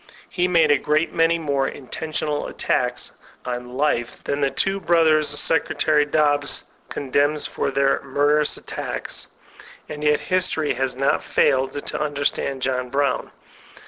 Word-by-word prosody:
He 180 0 +1
made 165 -4 +4
a 145 - +4
great 155 +2 0
many 165 +1 +3
more 140 -4 0
intentional 150 +2 -3
attacks - - -1 0.3
on 125 0 -5
life 130 -5 -1
than 140 0 -2
the 140 - +3
two 195 +7 0
brothers 160 -4 +3
Secretary 150 0 +2
Dobbs 145 -1 +1 0.3
condemns 145 +2 0
for - - -2
their 135 0 +2
''murder 145 +2 +2
ous 150 - -1
methods/' - - -6 0.6
And 150 0 -7
yet, 150 0 +3
history 185 -4 0
has 130 0 -2
not 135 +2 +1
failed 135 +1 +1
to - - -2
under 145 -1 -3
stand 135 -2 -1
John 125 -1 -1
Brown. 140 -1 0
145 Hz, 145 wpm, -22 LUFS, 135-155 Hz, 0.6 s, made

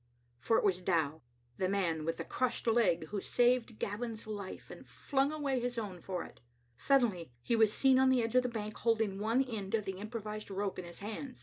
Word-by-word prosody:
For 225 - +2
it - - +1
was 185 -3 +2
Dow, 160 -4 0 0.4
the 185 - 0
man 170 -6 0
with 165 - -1
the - - -4
crushed 255 -1 -1
leg, 225 -9 +2
who 205 -2 -3
saved 245 -1 +2
Gavin's 220 +2 -4
life, 205 -3 -7
and - - -10
flung 275 0 0
away 285 -4 -1
his 245 0 -3
own 195 -6 -4
for 180 -1 -3
it. - - -14 0.3
Sud 270 - +4
denly 180 - -2
he 235 - +1
was 220 -2 +5
seen 265 +2 +4
on 265 0 +5
the 255 -2 +3
edge 225 - -2
of 255 - +6
the 250 - -2
bank, 215 -2 -5
holding 220 -4 +1
one 225 +5 +2
end 220 -6 -3
of 215 -2 -1
the 190 -1 -4
improvised 215 0 -5
rope 195 -1 -2
in 180 - -6
his 170 +2 -10
hand. 235 +5 -6
215 Hz, 220 wpm, -33 LUFS, 190-245 Hz, 0.4 s, of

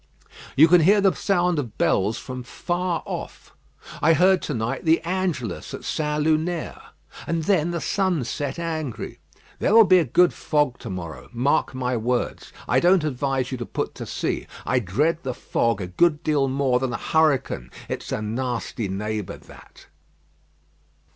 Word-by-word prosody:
You 155 +4 +8
can 175 +1 +6
hear 200 +6 +5
the 195 -1 +4
sound 180 -4 +1
of 120 -7 -6
bells 105 +4 +1
from 125 +1 -6
far 175 +6 -2
off. - - -7 0.5
I 165 - +5
heard 185 +3 +4
to 150 - -3
night 115 +4 -2
the 160 0 +4
Angelus 165 - -3
at - - -10
St. 150 -1 -1
Lunaire. 160 +2 -1 0.5
And 165 -1 -1
then 170 -2 +2
the 170 0 -2
sun 180 0 0
set 135 +4 -4
angry. 160 -7 -4 0.4
There 210 - +2
will 225 - +10
be 185 -3 +6
a - - +3
good 175 +7 +3
fog 145 -5 0
to 115 - -8
morrow, 85 -4 -7
mark 130 +2 +1
my 125 -1 -1
words. 120 +2 -2 0.2
I - - +3
don't 180 -1 +4
advise 135 -2 -1
you 130 - -4
to 120 - -4
put - - -3
to - - -8
sea. - - -3 0.2
I 125 - +2
dread 145 - 0
the 130 -4 -4
fog 115 -4 0
a - - -2
good 150 - +2
deal 145 -3 +2
more 130 -2 +1
than 130 -1 -2
a - - -1
hurricane. 145 - +1 0.2
It's - - -5
a 105 - -2
nasty 120 -1 -3
neighbour 105 +1 -4
that." - - -16
145 Hz, 170 wpm, -24 LUFS, 125-170 Hz, 0.5 s, will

